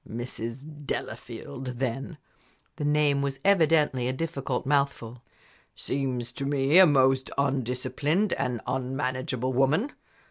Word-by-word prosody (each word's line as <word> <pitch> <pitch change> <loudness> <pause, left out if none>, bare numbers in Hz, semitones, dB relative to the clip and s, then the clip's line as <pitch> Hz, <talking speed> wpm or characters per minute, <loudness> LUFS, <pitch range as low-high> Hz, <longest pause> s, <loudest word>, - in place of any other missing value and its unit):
"Mrs. 125 +5 -7
Delafield, 125 +2 -5
then" 135 +4 -3 0.6
the - - -3
name 145 -1 +2
was 140 -1 -2
evidently 160 -9 +3
a - - +1
difficult 135 -4 -3
mouthful 135 -4 0 0.5
"seems 130 -3 -3
to 140 - -4
me 140 +4 +4
a 190 - +9
most 135 -2 +3
undisciplined 140 - 0
and 120 -3 -2
unmanageable 130 0 -2
woman. 150 - +2
135 Hz, 110 wpm, -27 LUFS, 125-145 Hz, 0.6 s, a